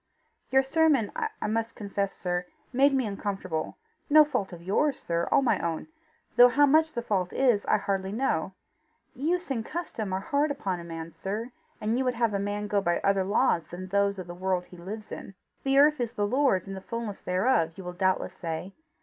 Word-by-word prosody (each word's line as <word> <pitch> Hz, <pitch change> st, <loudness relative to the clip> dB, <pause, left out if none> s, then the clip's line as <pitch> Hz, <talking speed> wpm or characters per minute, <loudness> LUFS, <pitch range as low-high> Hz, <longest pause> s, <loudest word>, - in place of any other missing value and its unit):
"Your 265 Hz, 0 st, +4 dB
sermon, 280 Hz, -5 st, +3 dB
I 445 Hz, -2 st, -3 dB
must 225 Hz, +2 st, -1 dB
confess, 200 Hz, -1 st, -2 dB
sir, 180 Hz, 0 st, -2 dB, 0.3 s
made 275 Hz, +3 st, +5 dB
me 265 Hz, -2 st, +1 dB
uncomfortable 195 Hz, -5 st, -3 dB, 0.3 s
no 305 Hz, +1 st, +8 dB
fault 210 Hz, -10 st, -2 dB
of 170 Hz, -1 st, -10 dB
yours, 270 Hz, +10 st, +1 dB
sir 170 Hz, 0 st, -1 dB
all -, -, +4 dB
my 255 Hz, -, +2 dB
own 165 Hz, -, -3 dB, 0.5 s
though 245 Hz, -, +10 dB
how 290 Hz, +4 st, +5 dB
much 315 Hz, +2 st, +4 dB
the 235 Hz, -, -3 dB
fault 190 Hz, -5 st, 0 dB
is, 245 Hz, -6 st, +2 dB
I -, -, +4 dB
hardly 195 Hz, -1 st, -2 dB
know: 200 Hz, -7 st, 0 dB, 0.6 s
use 335 Hz, +4 st, -1 dB
and 230 Hz, -4 st, -1 dB
custom 225 Hz, -, -4 dB
are 190 Hz, -, 0 dB
hard 285 Hz, +9 st, +1 dB
upon 200 Hz, -11 st, -2 dB
a -, -, -8 dB
man, 165 Hz, -1 st, -7 dB
sir, 215 Hz, +6 st, -4 dB, 0.3 s
and 220 Hz, +3 st, 0 dB
you 265 Hz, -, 0 dB
would 250 Hz, -1 st, +1 dB
have 230 Hz, -2 st, +1 dB
a 200 Hz, -, 0 dB
man 205 Hz, +1 st, -2 dB
go 205 Hz, -1 st, +1 dB
by 175 Hz, -2 st, +1 dB
other 195 Hz, -1 st, +2 dB
laws 180 Hz, -4 st, +2 dB
than 185 Hz, +2 st, -8 dB
those 200 Hz, 0 st, +2 dB
of 185 Hz, -, -6 dB
the 175 Hz, -, -8 dB
world 185 Hz, 0 st, -1 dB
he 180 Hz, -, -14 dB
lives 210 Hz, +5 st, -8 dB
in. 195 Hz, -, -8 dB, 0.3 s
The 270 Hz, 0 st, +2 dB
earth 300 Hz, +1 st, +6 dB
is 235 Hz, -2 st, -2 dB
the 205 Hz, -4 st, 0 dB
Lord's 250 Hz, -5 st, +2 dB
and 195 Hz, -, -6 dB
the 190 Hz, -, -7 dB
fulness 230 Hz, -1 st, -5 dB
thereof 180 Hz, -3 st, +1 dB
you 190 Hz, -, -7 dB
will 180 Hz, 0 st, -6 dB
doubtless 185 Hz, 0 st, 0 dB
say. 175 Hz, +1 st, -5 dB
205 Hz, 210 wpm, -28 LUFS, 185-260 Hz, 0.6 s, though